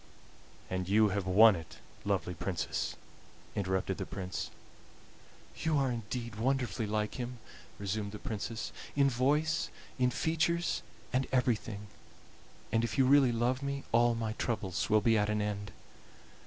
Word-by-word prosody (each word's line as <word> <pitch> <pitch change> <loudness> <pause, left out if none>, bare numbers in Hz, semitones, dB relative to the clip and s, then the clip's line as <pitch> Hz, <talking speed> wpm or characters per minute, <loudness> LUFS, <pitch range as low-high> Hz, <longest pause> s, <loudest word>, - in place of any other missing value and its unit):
"And 95 0 -3
you 105 +1 +5
have 100 -1 -1
won 105 +3 +8
it, 80 -2 -9 0.3
lovely - - 0
Princess," - - -2 0.6
interrupted 95 -1 -1
the - - -2
Prince. 95 -2 -4 1.1
"You 160 -2 +1
are 135 -2 +2
indeed 115 -1 -4
wonderfully 125 -2 0
like 105 +3 -1
him," 125 0 -4 0.4
resumed 100 +1 -2
the 105 - -6
Princess 110 +2 -4 0.2
"in 140 -1 +4
voice, 150 +6 +2 0.3
in 125 0 +4
features, 165 +5 +1 0.3
and 130 +1 +2
everything; 115 -5 0 0.9
and 115 +1 +2
if 115 +3 -2
you 135 - +5
really 135 -1 +6
love 120 +3 +1
me 140 0 -3
all 120 0 +4
my 110 -1 -2
troubles 100 -6 -2
will 110 0 +5
be 110 +1 +4
at 105 0 +1
an 105 0 +1
end." 105 -1 -2
115 Hz, 140 wpm, -32 LUFS, 105-130 Hz, 1.1 s, won